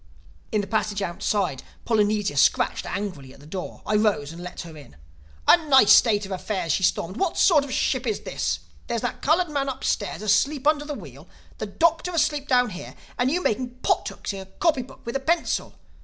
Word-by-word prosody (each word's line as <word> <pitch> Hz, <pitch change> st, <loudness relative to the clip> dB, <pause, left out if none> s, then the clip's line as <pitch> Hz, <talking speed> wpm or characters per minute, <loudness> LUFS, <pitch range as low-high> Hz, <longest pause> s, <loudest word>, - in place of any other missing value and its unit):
In 215 Hz, -, +1 dB
the -, -, -5 dB
passage 210 Hz, -1 st, -1 dB
outside 175 Hz, -4 st, -1 dB, 0.2 s
Polynesia 210 Hz, -5 st, +1 dB
scratched 140 Hz, -, +2 dB
angrily 180 Hz, -10 st, -5 dB
at -, -, -18 dB
the 145 Hz, -, -15 dB
door. 180 Hz, +4 st, -7 dB
I 210 Hz, -, +2 dB
rose 200 Hz, -9 st, +1 dB
and 170 Hz, -, -9 dB
let 180 Hz, 0 st, -7 dB
her 165 Hz, -2 st, -10 dB
in. 145 Hz, -, -14 dB, 0.5 s
"A -, -, +8 dB
nice 265 Hz, -6 st, +8 dB
state 210 Hz, -3 st, +4 dB
of 195 Hz, -, -9 dB
affairs!" 190 Hz, -2 st, -2 dB
she 175 Hz, -, +1 dB
stormed. 185 Hz, +1 st, 0 dB
"What 380 Hz, -4 st, -1 dB
sort 310 Hz, -7 st, +5 dB
of 280 Hz, -, -7 dB
a -, -, -4 dB
ship 260 Hz, -1 st, 0 dB
is 215 Hz, -, -1 dB
this? 75 Hz, 0 st, -2 dB, 0.3 s
There's 235 Hz, -, -2 dB
that -, -, -4 dB
colored 335 Hz, +3 st, +2 dB
man 280 Hz, -2 st, -1 dB
upstairs 230 Hz, -5 st, -2 dB
asleep 270 Hz, +7 st, +2 dB
under 295 Hz, -1 st, +3 dB
the 295 Hz, -1 st, -4 dB
wheel; -, -, -11 dB, 0.3 s
the -, -, -3 dB
Doctor 335 Hz, +1 st, +1 dB
asleep 295 Hz, -3 st, 0 dB
down 250 Hz, -3 st, +3 dB
here; 180 Hz, -, -9 dB, 0.2 s
and 245 Hz, +1 st, +3 dB
you 355 Hz, +5 st, 0 dB
making 245 Hz, +2 st, -1 dB
pot -, -, +1 dB
hooks -, -, -6 dB
in 195 Hz, -, -6 dB
a 190 Hz, -, -9 dB
copybook 265 Hz, -, -2 dB
with 235 Hz, -, -5 dB
a -, -, +1 dB
pencil! 330 Hz, +5 st, -1 dB
215 Hz, 205 wpm, -24 LUFS, 190-275 Hz, 0.5 s, A